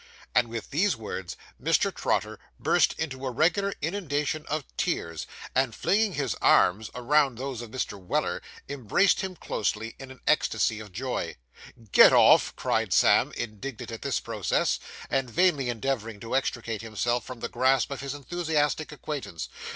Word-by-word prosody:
And 125 -1 +4
with 115 +2 -6
these 175 +4 +2
words, 95 -5 -6 0.2
Mr. - - +2
Trotter - - -1 0.2
burst - - +3
into 135 -4 -4
a 130 - -1
regular 165 +10 +2
inundation 155 -4 -2
of 155 0 -2
tears, 85 -1 -2 0.3
and, 130 -3 +1
flinging 210 0 +2
his 135 - -1
arms 105 +4 +4
around 135 0 +2
those 130 -2 -4
of 120 - -8
Mr. 110 -4 -4
Weller, 90 - -1 0.3
embraced 140 - +2
him 190 -2 -4
closely, 110 -5 -2
in 135 - -9
an 130 -2 -12
ecstasy 110 -1 +2
of 105 -2 -10
joy. 95 - -3 0.6
'Get - - +8
off!' - - +6
cried - - 0
Sam, - - +5
indignant 120 +2 -5
at 115 - -7
this 140 -2 0
process, 110 -4 0 0.3
and 135 -2 0
vainly 150 -3 +2
endeavouring 115 -3 -2
to 115 +2 -3
extricate 115 -5 -1
himself 115 +2 -1
from 125 -3 -9
the - - -2
grasp 130 +2 +2
of 140 - -4
his 140 0 -4
enthusiastic 155 +1 -1
acquaintance. 130 - -5
130 Hz, 155 wpm, -27 LUFS, 115-150 Hz, 0.6 s, Get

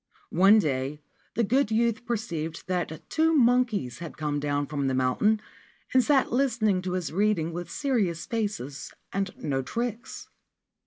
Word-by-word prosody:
One 195 +5 +6
day 145 -4 -1 0.3
the 235 - +2
good 255 +3 +2
youth 230 +1 +1
perceived 170 -9 -3
that 175 -3 -3
two 320 0 +2
monke) 240 - +3
had 170 -2 -8
come 150 -1 -1
down 145 0 0
from 140 -2 -2
the 130 - 0
mountain 130 +13 +2 0.5
and 260 -1 +5
sat 280 -1 +3
listenin 235 -7 +2
to 180 - -2
his 180 -5 -2
reading 185 -4 +1
with 175 0 -5
serious 210 - 0
faces 205 - -3 0.2
and 195 0 0
no 135 -3 -1
tricks. 235 - -4
195 Hz, 150 wpm, -27 LUFS, 155-235 Hz, 0.5 s, One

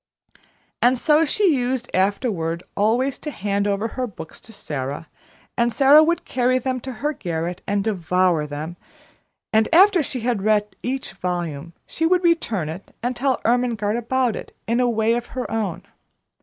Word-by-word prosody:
And 250 +2 +4
so 305 +5 +3
she 380 +2 +3
used 250 -1 -1
afterward 185 -4 0
always 240 +6 +1
to 300 - -5
hand 200 -5 -1
over 205 +3 -1
her 255 +1 -3
books 180 -6 -10
to 225 - -11
Sara, 145 -5 -5 0.5
and 235 0 +2
Sara 275 +5 +7
would 340 +2 0
carry 255 0 +1
them 255 0 -2
to 260 +2 -6
her 285 +6 -2
garret 175 - -4
and 200 0 0
devour 180 -5 +1
them; 155 +4 -6 0.8
and 220 0 +3
after 370 +1 +6
she 260 -4 -4
had 235 -3 0
read 210 0 +1
each 260 +1 -3
volume, 170 -3 -4
she 325 - -1
would 365 +1 +2
return 230 - +1
it 165 +5 -8
and 245 +1 -1
tell 265 +1 0
Ermengarde 235 -2 +1
about 245 0 0
it - - -9
in 230 +3 0
a 250 -1 +3
way 225 0 +2
of 240 0 -2
her 255 - -1
own. 215 -6 -2
230 Hz, 170 wpm, -22 LUFS, 185-260 Hz, 0.8 s, Sara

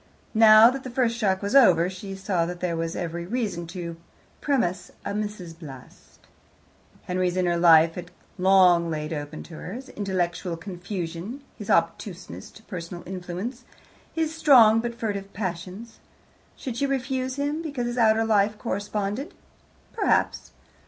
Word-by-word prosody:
Now 220 +1 +8
that 265 0 -6
the 255 - -6
first 240 -2 +1
shock 195 -5 0
was 200 +6 -1
over, 180 -11 +6
she 190 +1 -7
saw 190 -3 -1
that 175 0 -6
there 175 -2 -1
was 165 0 -3
every 170 0 -4
reason 200 -7 -2
to 170 -1 -6 0.4
premise 190 -11 0 0.2
a - - -2
Mrs. 205 -6 -5
Bast. 135 -6 -13 0.8
Henry's 180 0 -1
inner 175 -2 +2
life 165 -1 +6
had 175 0 -8 0.3
long 180 -2 +5
laid 155 0 -3
open 150 0 -6
to 165 - -11
her 180 - -7
his 260 +3 -8
intellectual 180 -3 -2
confusion, 180 +5 -6
his 210 -3 -9
obtuseness 170 +2 -1
to 220 - -17
personal 175 -3 -7
influence, 185 +7 -5 0.5
his 320 -1 -1
strong 245 -9 +6
but 235 0 -3
furtive 200 -4 -4
passions. 185 +3 -6 0.6
Should 245 -3 -6
she 280 - +1
refuse 260 -1 -2
him 290 +3 -2
because 285 -7 -3
his 240 +1 -2
outer 225 0 +4
life 210 -1 +2
corresponded? 210 - -3 0.6
Perhaps. 415 - +1
195 Hz, 145 wpm, -25 LUFS, 175-235 Hz, 0.8 s, Now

